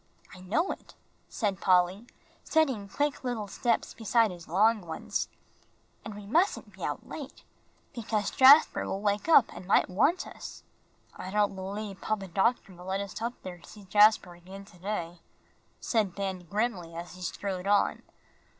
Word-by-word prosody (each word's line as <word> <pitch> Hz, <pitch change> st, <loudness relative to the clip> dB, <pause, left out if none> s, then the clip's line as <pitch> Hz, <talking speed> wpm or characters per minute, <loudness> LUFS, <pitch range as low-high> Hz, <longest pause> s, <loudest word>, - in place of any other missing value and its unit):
"I 185 Hz, -, -12 dB
know 230 Hz, -, 0 dB
it," -, -, -10 dB, 0.3 s
said 200 Hz, -5 st, -2 dB
Polly, 185 Hz, +4 st, +2 dB, 0.4 s
setting 265 Hz, -11 st, +1 dB
quick 290 Hz, +7 st, -1 dB
little 240 Hz, -5 st, -3 dB
steps 235 Hz, +4 st, -1 dB
beside 225 Hz, -1 st, +2 dB
his 175 Hz, -2 st, -11 dB
long 210 Hz, +6 st, +3 dB
ones, 160 Hz, -2 st, -3 dB, 0.8 s
"and 215 Hz, -, -7 dB
we 205 Hz, -1 st, -9 dB
mustn't 335 Hz, -, +1 dB
be -, -, -11 dB
out -, -, -4 dB
late, -, -, -9 dB, 0.5 s
because 215 Hz, -3 st, -2 dB
Jasper 275 Hz, +4 st, +6 dB
will 195 Hz, -, -3 dB
wake 205 Hz, +8 st, 0 dB
up 280 Hz, -7 st, +6 dB
and 180 Hz, -, -10 dB
might 195 Hz, -, +3 dB
want 330 Hz, -, +2 dB
us." -, -, -10 dB, 0.5 s
"I 185 Hz, -, -7 dB
don't 205 Hz, +1 st, +1 dB
believe 195 Hz, +1 st, -6 dB
Papa 200 Hz, -3 st, -2 dB
Doctor 195 Hz, +2 st, 0 dB
will 180 Hz, 0 st, -13 dB
let 190 Hz, +1 st, -2 dB
us 200 Hz, +2 st, -6 dB
up 235 Hz, +2 st, -2 dB
there 180 Hz, -1 st, -8 dB
to -, -, -16 dB
see 210 Hz, -, -13 dB
Jasper 205 Hz, -1 st, +4 dB
again 190 Hz, +3 st, -12 dB
to 185 Hz, -3 st, -18 dB
day," 175 Hz, -3 st, -4 dB, 0.6 s
said 215 Hz, -6 st, 0 dB
Ben, 190 Hz, -3 st, -4 dB
grimly, 200 Hz, -6 st, -2 dB
as 170 Hz, +1 st, -7 dB
he 185 Hz, -, -12 dB
strode 185 Hz, +1 st, -4 dB
on. 205 Hz, 0 st, +2 dB
200 Hz, 165 wpm, -29 LUFS, 185-225 Hz, 0.8 s, Jasper